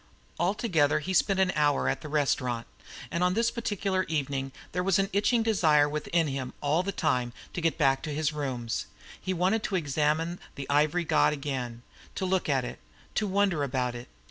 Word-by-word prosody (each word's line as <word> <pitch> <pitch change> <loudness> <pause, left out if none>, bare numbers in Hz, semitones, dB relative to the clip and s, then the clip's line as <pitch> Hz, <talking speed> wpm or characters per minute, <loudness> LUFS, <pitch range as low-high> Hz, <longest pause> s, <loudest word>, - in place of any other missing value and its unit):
Altogether 175 -6 +2
he 170 +5 -3
spent 190 +1 +3
an 190 -1 +3
hour 145 -2 +2
at - - 0
this 155 - -7
restaurant; 130 -5 0 0.5
and 170 +1 0
on 180 +1 +2
this 230 +1 +2
particular 200 -4 -1
evening 140 -3 -2 0.2
there 180 - -1
was 190 0 +2
an 195 0 0
itching 225 +4 +3
desire 155 -10 +4
within 155 +3 0
him 135 -2 -4
all 150 +4 +2
the 195 +2 -2
time 125 -8 0 0.2
to 175 - -3
get 165 -1 +1
back 135 -3 +3
to 155 - -4
his 150 +1 0
rooms. 130 -6 -3 0.3
He 185 - -2
wanted 185 +5 +1
to 205 - -2
examine 155 +2 0 0.2
the 140 -1 -6
ivory 150 +4 +3
god 155 - +3
again, 130 -5 -4 0.3
to 190 - -2
look 185 -3 0
at 135 -3 +2
it, - - -7 0.3
to 215 - 0
wonder 195 -5 +2
about 125 -2 -1
it. 120 0 -8
155 Hz, 190 wpm, -28 LUFS, 140-185 Hz, 0.5 s, desire